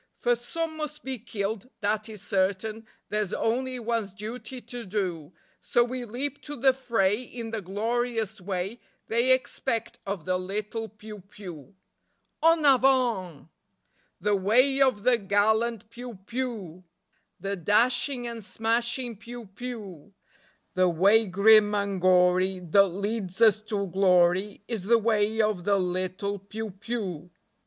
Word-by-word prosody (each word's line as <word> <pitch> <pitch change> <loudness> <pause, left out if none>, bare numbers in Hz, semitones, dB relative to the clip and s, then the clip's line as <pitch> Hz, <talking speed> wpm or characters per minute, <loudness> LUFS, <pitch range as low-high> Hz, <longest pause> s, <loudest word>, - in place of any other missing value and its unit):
For 240 0 +2
some 315 +7 -4
must 300 0 -5
be 265 -2 -4
killed, 215 +1 -4
that 210 +1 -1
is 210 -3 -8
certain; 205 +3 -1 0.2
There's 210 -2 -1
only 255 +3 -1
one's 230 -4 -2
duty 235 +5 -7
to 245 0 -7
do; 185 -6 -3 0.3
So 240 - +3
we 250 +1 -4
leap 260 +5 -4
to 295 - -5
the 265 +1 +4
fray 225 -5 +1
in 235 -2 -7
the 225 -2 -3
glorious 225 +2 -2
way 190 +4 -3 0.3
They 235 +3 +3
expect 250 -2 -1
of 195 -5 -4
the 185 0 0
little 210 +4 -4
piou 210 0 -11
piou. 190 -3 -11 0.7
En 325 -1 +4
avant! 245 - +3 0.7
The 210 -1 +2
way 250 +8 +3
of 255 -7 +3
the 245 -1 +4
gallant 220 +2 +1
piou 245 -3 -8
piou, 220 -9 -4 0.6
The 200 0 -3
dashing 240 - +1
and 230 -2 -6
smashing 230 +2 -1
piou 235 +2 -9
piou; 205 -7 -8 0.6
The 185 -1 +3
way 200 +6 +4
grim 210 +2 +6
and 200 -2 -1
gory 185 +1 +4
that 185 +3 +4
leads 200 0 -4
us 215 -2 +5
to 205 -2 -1
glory 185 +1 +2
Is 220 -6 -3
the 235 +3 +5
way 220 -1 +2
of 210 -4 0
the 200 +1 +3
little 185 +2 -2
piou 210 +2 -6
piou. 195 -8 -4
215 Hz, 140 wpm, -27 LUFS, 195-240 Hz, 0.7 s, grim